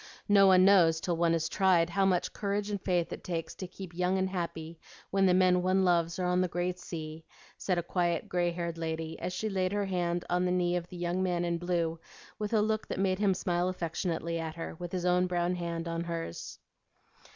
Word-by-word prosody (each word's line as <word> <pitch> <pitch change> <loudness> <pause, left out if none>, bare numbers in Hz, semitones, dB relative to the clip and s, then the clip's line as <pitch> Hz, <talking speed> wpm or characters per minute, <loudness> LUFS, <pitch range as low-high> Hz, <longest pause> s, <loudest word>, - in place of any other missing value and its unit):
No 200 -2 +6
one 185 -1 +6
knows 170 -5 +5
till 175 +1 -1
one 165 0 +2
is 160 -1 -1
tried, 180 -3 +3
how 195 +2 +2
much 180 -2 0
courage 205 0 -2
and 200 -2 -3
faith 180 -3 0
it - - -8
takes 165 -2 -4
to 185 - -7
keep 185 -1 -10
young 180 +2 +1
and 190 0 +1
happy 170 -2 -5 0.3
when 195 0 +3
the 180 - +4
men 180 -1 +4
one 185 +1 +2
loves 170 -1 +2
are 180 - -1
on 180 0 +2
the 185 - +1
great 175 +1 -2
sea," 160 -1 -7 0.3
said 185 -2 -1
a 175 - 0
quiet, 175 -1 -1
gray 175 -1 +1
haired 170 -1 -4
lady, 160 0 -4
as 180 - -3
she 185 +4 -3
laid 190 -2 -1
her 205 -1 0
hand 175 -2 -1
on 180 +1 +1
the 180 - +1
knee 180 -1 +1
of 175 -1 -3
the 180 - -10
young 175 +1 -1
man 175 -2 0
in 170 -1 -1
blue 170 -2 -1 0.4
with 210 -1 -3
a 220 -2 +3
look 215 0 -1
that - - -4
made 190 -1 +1
him 200 -2 +3
smile 175 0 0
affectionately 170 -1 -2
at 160 -1 -4
her, 165 - -5
with 175 -1 -6
his 180 -1 -2
own 180 0 +3
brown 175 0 0
hand 170 -1 -4
on 165 0 -3
hers. 165 - -5
180 Hz, 230 wpm, -30 LUFS, 170-185 Hz, 0.4 s, No